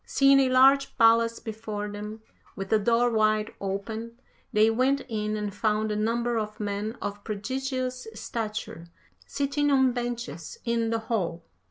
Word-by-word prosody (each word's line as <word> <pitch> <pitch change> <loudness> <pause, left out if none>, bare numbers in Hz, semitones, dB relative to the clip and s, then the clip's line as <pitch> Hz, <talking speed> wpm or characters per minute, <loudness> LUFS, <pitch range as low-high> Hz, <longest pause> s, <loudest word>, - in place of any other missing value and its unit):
Seeing 275 0 +4
a 265 -1 +3
large 270 +2 +5
palace 230 -1 +5
before 215 -2 -5
them, 210 +1 -7 0.3
with 195 -2 -5
the 220 - +4
door 235 +3 +2
wide 215 -1 +2
open, 220 +4 -4 0.3
they 215 0 +4
went 260 +4 +2
in 215 -2 -2
and 210 -1 -3
found 215 +1 0
a - - -1
number 230 +2 0
of 215 0 -5
men 210 +2 -3
of 205 0 -5
prodigious 255 +3 -3
stature 215 -7 -5 0.4
sitting 285 +1 0
on 265 -2 +4
benches 235 - -5
in 230 -1 0
the 230 - +1
hall. 200 -7 -2
225 Hz, 150 wpm, -27 LUFS, 210-245 Hz, 0.4 s, large